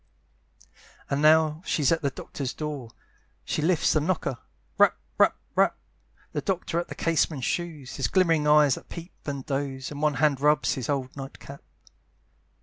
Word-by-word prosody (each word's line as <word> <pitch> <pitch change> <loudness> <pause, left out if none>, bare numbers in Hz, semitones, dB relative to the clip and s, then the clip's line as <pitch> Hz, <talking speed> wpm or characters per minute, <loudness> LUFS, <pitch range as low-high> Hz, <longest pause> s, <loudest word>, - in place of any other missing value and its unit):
And 140 +1 +1
now 155 0 +4
she's 150 -5 +1
at 165 - +2
the 140 - +1
doctor's 135 0 -6
door, 150 -6 -5 0.6
She - - -1
lifts 165 +1 +2
the 155 - +3
knocker, 150 -6 -1 0.4
rap, - - +5 0.2
rap, - - +5 0.2
rap, - - +3 0.5
The 150 - -2
doctor 170 +1 -1
at 175 - -4
the - - -8
casement 160 -4 0
shews, 155 -3 -3
His - - +1
glimmering 165 -5 +2
eyes 150 -2 +6
that - - -7
peep 170 +1 -9
and 140 -2 -4
doze; 135 -1 -3
And 145 0 -6
one 150 -2 +2
hand 145 -2 +2
rubs 150 +1 +3
his 130 -1 -5
old 135 -3 -2
night 135 -1 -8
cap. 140 0 -11
150 Hz, 165 wpm, -26 LUFS, 140-160 Hz, 0.6 s, eyes